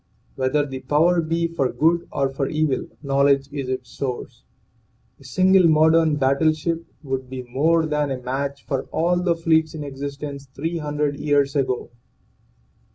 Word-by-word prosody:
Whether 135 +3 +1
the 135 -2 -6
power 160 +7 +2
be 165 +1 0
for 140 -6 -1
good 170 +2 +1
or 140 -2 +1
for 135 0 -2
evil, 155 -3 0 0.2
knowledge 140 0 +2
is 135 -3 -4
its 130 -2 -4
source. 130 -3 -5 0.8
A - - -17
single 185 -1 +4
modern 160 0 +4
battleship 155 +4 +1 0.2
would 130 -2 -4
be 130 -1 -6
more 160 +7 +2
than 150 -2 0
a 135 - -2
match 140 +2 -4
for 135 -3 -2
all 175 +2 0
the 175 -2 +1
fleets 160 -1 +1
in 150 - -5
existence 140 0 -6
three 165 +4 -2
hundred 150 -1 -1
years 145 -2 +1
ago. 130 -4 -1
145 Hz, 155 wpm, -22 LUFS, 135-160 Hz, 0.8 s, single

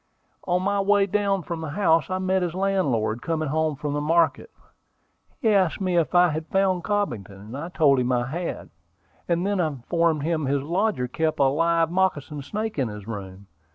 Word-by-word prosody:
On 180 0 +1
my 200 +1 +1
way 200 0 +3
down 200 -1 0
from 170 -1 -5
the 160 - -4
house 165 -2 +2
I 185 - -1
met 185 0 0
his 175 -1 -2
landlord, 135 - 0
coming 155 -2 -2
home 155 0 0
from 145 +1 -4
the 145 - -1
market. 165 - +1 0.9
He 230 - +2
asked 190 -5 +2
me 185 -2 0
if 170 +1 +1
I 175 0 +6
had 155 +1 -4
found 190 -1 +1
Cobbington. 110 - -3
I 165 +5 -5
told 145 -6 +3
him 125 0 0
I 120 -1 +1
had, 165 +7 -5 0.6
and 175 +1 0
then 200 -1 0
informed 160 +1 0
him 155 -3 -1
his 140 0 0
lodger 175 -3 0
kept 160 +5 -1
a - - +5
live 165 +4 +2
moccasin 160 -6 0
snake 215 +5 -4
in 130 - +1
his 105 -1 -8
room. 100 -3 -7
165 Hz, 190 wpm, -24 LUFS, 140-185 Hz, 0.9 s, I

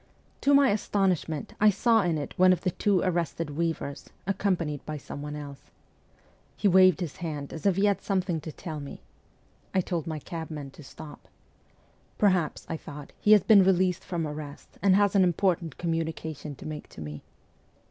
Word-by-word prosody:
To 285 0 +4
my 280 -1 +5
astonishment, 190 -7 -1
I 215 - +7
saw 225 +3 +3
in 170 -4 0
it 145 - -5
one 185 0 +6
of 185 - +1
the 180 - 0
two 195 0 +1
arrested 170 -3 -1
weavers, 160 -2 -3 0.2
accompanied 175 -7 -1
by 155 0 -5
someone 150 +1 -7
else. 145 -2 -9 0.9
He - - +2
waved 185 -3 +6
his 165 -5 -4
hand 150 -5 -5
as 165 +4 -2
if 195 - +3
he 195 +2 +2
had 200 -2 +2
something 185 -5 -1
to 155 - -7
tell 155 -1 -7
me. 140 -1 -9 0.7
I 190 - +4
told 170 -3 -3
my 160 -1 -3
cabman 155 -3 -6
to 145 - -14
stop. 145 +1 -12 0.9
'Perhaps,' 185 -7 +1
I 160 - -3
thought, 145 -2 -10
'he 210 - +5
has 210 - +6
been 205 -4 +7
released 185 -1 +2
from 170 -3 -3
arrest, 150 -1 -9
and 190 0 +5
has 200 0 +3
an 195 - +6
important 175 -3 0
communication 160 -3 -3
to - - -12
make 155 -1 -7
to - - -13
me.' 75 -1 -7
170 Hz, 180 wpm, -27 LUFS, 150-190 Hz, 0.9 s, I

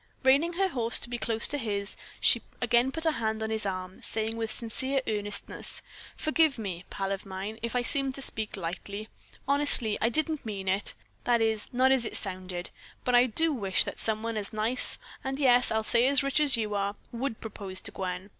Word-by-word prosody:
Reining 280 +6 +4
her 380 +2 +1
horse 235 -7 +1 0.2
close 225 -1 +2
to 290 - 0
his, 200 -4 -2 0.2
she - - +4 0.2
again 245 +1 +3
put 320 +3 -3
a 320 - +4
hand 220 -4 -1
on 220 - -2
his 220 -2 -1
arm, 185 -1 -5
saying 220 0 -2
with 225 -1 -2
sincere 260 +5 -1
earnestness: 205 -1 -3 0.3
"Forgive 310 -2 +2
me, 185 -5 -5
pal 195 0 -3
of 195 0 -3
mine, 195 +3 -6
if 235 +2 -3
I 245 - +2
seemed 270 +2 +1
to 275 - -5
speak 215 -4 -3
lightly. 200 +4 -5 0.4
Honestly, 280 -6 +3
I 230 - +4
didn't 310 +3 +1
mean 200 -4 -5
it 195 +2 0 0.3
that 240 -1 +4
is, 220 -2 0
not 255 +1 +4
as 255 -4 +3
it - - -2
sounded. 185 -2 -4 0.3
But 250 - 0
I 245 +1 +6
do 320 +7 +2
wish 195 -7 +2
that - - -6
someone 220 +1 -1
as 205 -1 -4
nice 220 +4 +2 0.3
and 265 0 -2
yes, 250 -3 +5
I'll 220 0 0
say 235 +3 +3
as 280 +1 +5
rich 275 +1 +2
as 285 -4 +4
you 215 -2 -2
are, 200 0 -1 0.2
would 235 -1 -3
propose 195 -4 -2
to - - 0
poor 190 - -4
Gwen. 180 +2 -5
225 Hz, 200 wpm, -29 LUFS, 205-265 Hz, 0.4 s, I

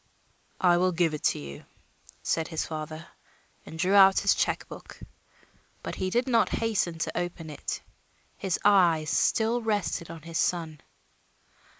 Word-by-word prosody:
"I 175 -1 +4
will 185 +1 +2
give 165 -2 +1
it 150 - -5
to - - +2
you," 70 -1 -9 0.6
said 165 0 0
his 160 -2 -3
father, 155 0 -6 0.6
and 160 - -8
drew 185 +4 +1
out 195 -1 +7
his - - +4
check - - -1
book. - - -11 0.8
But - - -5
he 185 - -2
did 240 +7 0
not 235 -3 +3
hasten 210 -7 -1
to 160 - -3
open 175 -2 -4
it; 145 - -5 0.5
his 190 -3 -2
eyes 170 -6 +4
still 225 +8 +2
rested 205 -6 -1
on 165 -2 -9
his 165 0 -4
son. 160 -4 -1
175 Hz, 155 wpm, -27 LUFS, 160-195 Hz, 0.8 s, out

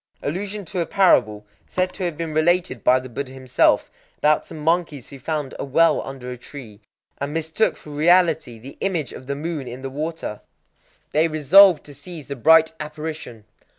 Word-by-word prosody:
Allusion 200 +6 -4
to 185 +2 -5
a 170 - -1
parable, 110 - +3 0.2
said 185 0 -1
to 190 - -6
have 170 -4 -3
been 165 -1 -4
related 170 - +1
by 130 +1 +5
the 130 - -9
Buddha 130 +2 -6
himself, 130 -1 +1 0.3
about 150 0 +2
some - - -9
monkeys 160 -3 -1
who 140 - -11
found 150 -1 -3
a - - -2
well 165 +5 +3
under 130 -2 -8
a 125 - -7
tree, 120 -5 -11 0.4
and 140 +2 -4
mistook 165 +7 0
for 150 - -12
reality 160 -4 +2
the 130 +5 -12
image 170 -9 -2
of 130 - -11
the 140 - -2
moon 150 -2 -4
in 125 +2 -8
the 135 - -5
water. 150 -6 -5 0.7
They 155 +2 +3
resolved 165 +3 +6
to 145 - -12
seize 160 0 -10
the 140 - -3
bright 160 +5 +5
apparition. 150 -7 -7
150 Hz, 185 wpm, -22 LUFS, 135-165 Hz, 0.7 s, resolved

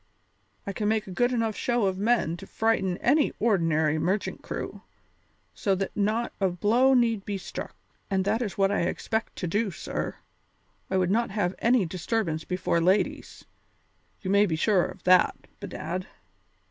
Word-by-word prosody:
I 200 - -4
can 210 +1 -2
make 220 0 +1
a 190 - -9
good 245 +7 +1
enough 225 -3 0
show 240 -3 0
of 190 -1 -1
men 210 -6 +2
to 195 - -11
frighten 195 -5 0
any 290 +4 +2
ordinary 160 -8 +2
merchant 190 +6 -1
crew - - -6 0.7
so 195 -3 0
that 195 +1 -3
not 220 +3 0
a 190 - +3
blow 230 +9 +3
need 230 -4 +2
be 200 -1 -3
struck. 185 - -7 0.3
And 190 -1 0
that 220 +4 +1
is 210 -5 -3
what 195 0 +3
I 205 - +1
expect 220 +5 -2
to 180 - -3
do, 210 +5 0
sir. 180 - -4 0.7
I 190 - +1
would 185 0 +1
not 235 +3 +1
have 195 -3 -1
any 235 -3 +3
disturbance 175 -1 -2
before 180 -2 0
ladies, 185 +4 0 0.8
you 190 - -2
may 200 +1 +5
be 160 - 0
sure 185 +2 +3
of - - -9
that, 185 0 +5 0.2
bedad. 185 -2 -5
200 Hz, 170 wpm, -27 LUFS, 180-225 Hz, 0.8 s, may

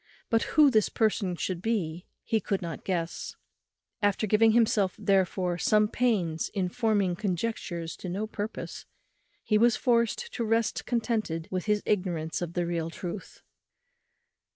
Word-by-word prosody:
But 225 -1 +4 0.2
who 295 -3 +8
this 215 -3 +3
person 210 -5 +1
should 175 0 -3
be 180 -6 -2 0.2
he 225 - +1
could 195 -2 -1
not 170 -2 -6
guess. 170 -3 -3 0.7
After 205 +1 +2
giving 220 +2 +4
himself, 215 -5 +3
therefore, 185 -2 +1
some 210 +2 +4
pains 200 -10 0
in 185 -3 0
forming 205 -4 +1
conjectures 180 -4 -3
to 185 - -6
no 195 +5 -2
purpose, 215 0 -6 0.6
he 215 -1 +2
was 235 +1 +5
forced 245 - +1
to 235 - -2
rest 225 0 0
contented 220 -9 -1
with 185 -1 -2
his 210 -1 +1
ignorance 175 -6 -1
of 170 -1 -4
the 175 -1 0
real 170 -1 -2
truth. 180 +3 -7
200 Hz, 145 wpm, -28 LUFS, 175-225 Hz, 0.7 s, who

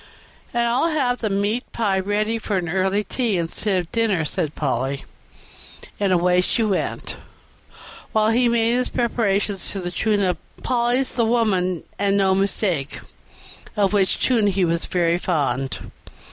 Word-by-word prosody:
"And 235 0 +1
I'll 240 +7 +2
have 260 -6 0
the 220 - -1
meat 205 +5 -1
pie 200 -4 0
ready 210 +3 0
for 210 -2 -1
an 175 -2 -2
early 190 +3 +1
tea 225 -1 -1
instead 180 +3 0
of - - -9
for - - -27
dinner," 215 -8 +1
said 155 -1 -2
Polly; 135 -1 -1 1.0
and 200 -2 +1
away 180 0 +3
she 225 +5 0
went, 205 -3 -2 0.9
while 215 0 +3
he 240 +1 +3
made 235 0 +2
his 250 - 0
preparations 205 -5 0
to 200 - -4
the 175 -1 -4
tune 210 +2 +1
of 180 -1 +1 0.3
"Polly's 245 +1 +1
the 240 - 0
woman 195 -7 +1 0.2
and 200 0 +2
no 190 -1 +3
mistake", 190 -6 0 0.8
of 200 -1 +2
which 195 -2 +2
tune 230 -5 +3
he 195 -2 +2
was 170 0 0
very 170 -1 +1
fond. 135 -7 -2
200 Hz, 160 wpm, -22 LUFS, 180-225 Hz, 1.0 s, away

